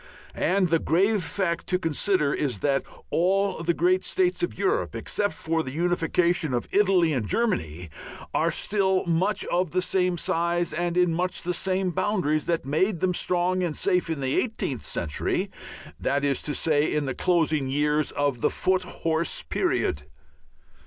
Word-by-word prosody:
And 185 +1 +1
the 165 0 +3
grave 195 +6 +2
fact 170 -1 -2
to 180 - +2
consider 165 -2 0
is 130 -10 -2
that 140 -2 +2 0.3
all 195 +1 +1
the 170 0 0
great 185 +2 +2
states 365 -2 +1
of 350 - -2
Europe, - - 0
except 205 -1 -1
for 165 0 -1
the 130 -4 -6
unification 170 -2 +1
of 120 - -2
Italy 190 -5 +3
and 120 -7 -1
Germany, 90 - -1 0.4
are - - +2
still 190 -2 +1
much 180 +5 0
of 180 0 +1
the 180 +1 0
size 170 0 0
and 175 +2 -1
in 180 -2 +3
much 180 +2 -2
the 180 - -1
same 185 +1 0
boundaries 160 -5 0
that 170 -5 0
made 165 +6 +1
them 185 +1 +1
strong 180 +1 0
and 170 -4 -2
safe 180 -3 +1
in 160 -4 -2
the 130 0 +1
eighteenth 215 - -3
century, 75 -3 -2 0.5
that 140 +1 0
is 140 -2 +1
to 145 - -2
say, 155 -1 +2
in 150 -1 0
the 135 - -2
closing 155 -4 +1
years 150 +2 +1
of 140 -4 -1
the - - +3
foot 185 0 +1
horse 165 -2 -2
period. 75 0 -1
170 Hz, 165 wpm, -25 LUFS, 150-185 Hz, 0.5 s, the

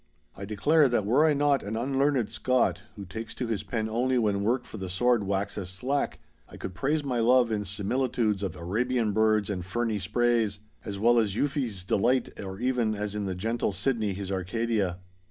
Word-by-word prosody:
I 100 - -7
declare 140 +9 +3
that 120 -4 +1
were 130 +9 +4
I 150 - +3
not 145 -1 +2
an 105 +2 -4
unlearned 135 -1 +1
Scot, 130 -1 +1
who 100 - -8
takes 110 +4 -7
to 125 - -3
his 110 -4 -2
pen 110 +1 -2
only 125 +4 +1
when 105 -4 +1
work 120 +5 0
for - - -9
the 95 -2 -5
sword 115 +3 +2
waxes 100 -1 -2
slack, 130 +10 -2 0.3
I - - -11
could 95 - -6
praise 145 - 0
my 125 -4 -1
love 120 0 +4
in 105 -1 0
similitudes 105 +1 0
of 95 -4 -3
Arabian 110 +7 0
birds 110 -1 +3
and 90 -3 -3
ferny 110 +3 -1
sprays, 110 +1 +1 0.3
as 100 -2 -5
well 120 +3 +4
as 105 -4 0
Euphues' 130 - -1
Delight 125 +6 +2
or 95 -1 -6
even 120 -3 +1
as 105 0 -3
in 105 -1 -3
the 95 -1 -2
gentle 110 +2 -1
Sydney 105 +1 0
his 100 0 -5
Arcadia. 95 0 -1
110 Hz, 190 wpm, -28 LUFS, 100-125 Hz, 0.3 s, were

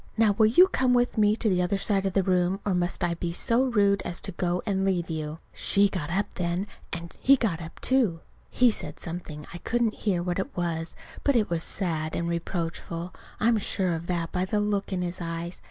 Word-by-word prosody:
Now, 220 -2 +5
will 215 +2 +4
you 300 +12 +7
come 255 -8 +2
with 245 0 +2
me 210 -1 +4
to 225 - -1
the 185 -3 +3
other 180 +2 +1
side 195 0 +1
of 190 - -2
the 195 - +3
room, 180 +1 +1
or 200 - +1
must 175 0 -1
I 175 -1 +1
be 170 0 -3
so 230 +8 +2
rude 200 -5 +3
as 175 -1 -3
to 195 - -3
go 175 0 -1
and 195 -3 0
leave 180 -3 0
you?" 155 -1 -4 0.2
She 200 0 +3
got 170 -6 -4
up 195 +4 -1
then, 175 +2 -1 0.3
and 170 0 -6
he 275 - +6
got 200 -10 -1
up, 165 0 -9
too. 230 -11 +2 0.3
He 245 -1 +4
said - - -4
something 165 -3 -6
I 175 - -7
couldn't 235 +1 0
hear 185 -5 -1
what 175 +1 -1
it 190 - -4
was; 165 -2 -2 0.3
but 280 - +3
it 215 -6 +2
was 170 -1 0
sad 160 -4 -2
and 170 - -1
reproachful 170 0 -3 0.3
I'm 225 0 +3
sure 185 -3 0
of 165 +1 -4
that 170 -2 -1
by 180 - 0
the 205 +3 0
look 205 -1 -1
in 180 -1 -1
his 175 +1 -4
eyes. 170 +1 -4
185 Hz, 225 wpm, -27 LUFS, 170-205 Hz, 0.3 s, you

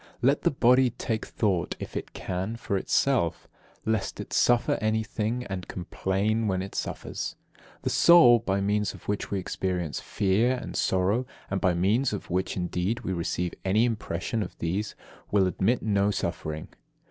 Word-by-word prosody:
Let 140 +4 +4
the - - +3
body 130 -1 +4
take 115 -2 -3
thought, 95 -6 0
if - - -7
it - - -5
can, 95 +5 -3
for 115 -4 -3
itself, 95 -2 +1 0.4
lest 110 -3 -1
it - - -6
suffer 120 -1 +3
anything, 110 +2 -1
and 95 -2 -5
complain 100 +5 -1
when 95 -2 0
it 95 - -8
suffers. - - -4 0.5
The - - 0
soul, 130 -9 +7
by 100 -3 -1
means 105 0 0
of - - -15
which 105 0 -2
we 100 - -1
experience 90 -3 -2
fear 105 +6 +1
and 125 - -7
sorrow, 100 +7 +1 0.2
and 95 - -1
by 90 -3 +3
means 105 +9 +2
of 100 - -5
which, 95 +2 -1
indeed, 90 +5 -1
we 95 - -2
receive 85 0 -2
any 105 +5 +3
impression 110 -1 -2
of - - -6
these, 95 +6 -2 0.3
will 100 -2 +3
admit 95 +6 +1
no 100 -2 +2
suffering. 80 -5 -3
100 Hz, 160 wpm, -27 LUFS, 95-115 Hz, 0.5 s, soul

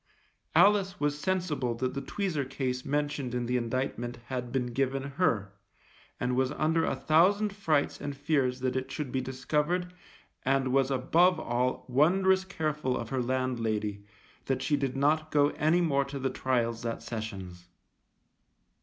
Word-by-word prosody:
Alice 195 +2 +4
was 145 0 0
sensible 150 -9 -1
that 130 +2 -2
the 140 - -3
tweezer 160 0 -2
case 130 -2 -2
mentioned 145 -3 -2
in 120 -1 -1
the 125 +1 -1
indictment 120 0 -2
had 125 -2 -3
been 125 -2 -1
given 135 +1 0
her, 135 - 0 0.7
and 125 0 0
was 130 +1 +1
under 160 +2 +1
a - - 0
thousand 200 +6 +3
frights 160 -8 0
and 145 -1 -4
fears 135 -3 0
that 130 0 0
it 130 0 -3
should 145 -4 -4
be 130 - 0
discovered 150 +7 -1 0.5
and 135 -1 +1
was 135 -1 +3
above 165 +7 +3
all 125 0 -1
wondrous 190 +8 +3
careful 155 -8 -2
of 115 -1 -5
her 130 -1 -1
landlady, 115 -5 -1 0.4
that 135 -1 -1
she 145 +2 +2
did 135 -2 -2
not 155 +3 +2
go 145 -1 +4
any 160 +4 +2
more 140 -5 +2
to 140 +1 -6
the 135 -1 -1
trials 120 -3 0
that 115 -1 -4
Sessions. 95 -6 -6
135 Hz, 155 wpm, -29 LUFS, 125-155 Hz, 0.7 s, Alice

